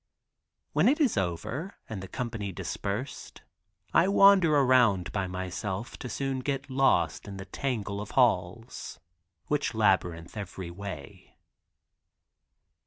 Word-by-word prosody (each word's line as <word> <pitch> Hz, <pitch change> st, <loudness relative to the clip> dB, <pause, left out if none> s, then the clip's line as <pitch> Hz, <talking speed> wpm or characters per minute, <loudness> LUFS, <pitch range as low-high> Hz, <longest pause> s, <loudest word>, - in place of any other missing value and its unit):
When -, -, +4 dB
it 295 Hz, -, +2 dB
is 280 Hz, -7 st, +3 dB
over, 95 Hz, -, -3 dB
and 105 Hz, -4 st, -5 dB
the 95 Hz, -, -7 dB
company 110 Hz, -1 st, -4 dB
dispersed, 100 Hz, +7 st, -5 dB, 0.5 s
I 170 Hz, -, +5 dB
wander 195 Hz, -5 st, +6 dB
around 125 Hz, -9 st, +4 dB
by 100 Hz, -2 st, -1 dB
myself 95 Hz, +4 st, -4 dB
to 125 Hz, -, -6 dB
soon 135 Hz, 0 st, -2 dB
get 135 Hz, +1 st, -3 dB
lost 130 Hz, -, +2 dB
in 100 Hz, -1 st, -7 dB
the 95 Hz, -, -7 dB
tangle 105 Hz, -2 st, -3 dB
of 105 Hz, -, -7 dB
halls, 115 Hz, -1 st, +1 dB, 0.5 s
which 145 Hz, -5 st, -1 dB
labyrinth 95 Hz, -5 st, +1 dB
every 95 Hz, -4 st, -6 dB
way. 90 Hz, -6 st, -9 dB
105 Hz, 120 wpm, -28 LUFS, 95-135 Hz, 0.5 s, wander